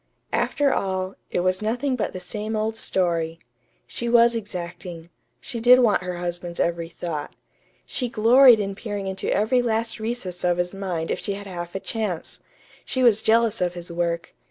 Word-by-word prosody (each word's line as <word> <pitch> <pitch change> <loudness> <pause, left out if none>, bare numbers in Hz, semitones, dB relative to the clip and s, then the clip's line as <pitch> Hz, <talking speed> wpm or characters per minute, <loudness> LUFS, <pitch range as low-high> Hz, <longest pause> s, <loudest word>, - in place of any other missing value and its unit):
After 285 -2 +2
all, 190 -1 -1 0.2
it - - 0
was 185 +1 +1
nothing 245 +5 0
but 235 - -2
the 185 - -6
same 210 +4 -4
old 215 +1 -1
story. 170 -6 0 0.5
She 235 - -4
was 235 0 +5
exacting. 175 -4 -6 0.3
She 240 -4 -4
did 245 +2 +7
want 235 -7 +3
her 180 -1 -4
husband's 175 0 -4
every 170 -1 0
thought. 160 -3 -5 0.5
She 250 -2 -2
gloried 235 +2 +7
in 200 -1 -2
peering 205 -1 -5
into 190 0 -2
every 235 +5 +2
last 225 -1 -1
recess 220 -6 -4
of 175 -1 +2
his 175 +1 -1
mind 185 -4 -3
if - - -1
she 200 - -2
had 200 +1 -7
half 175 -2 -7
a - - -1
chance. 205 -6 -3 0.4
She 260 - -1
was 220 -3 +5
jealous 230 -1 +3
of 180 -1 0
his 175 0 -8
work. 170 0 -2
195 Hz, 180 wpm, -24 LUFS, 175-230 Hz, 0.5 s, did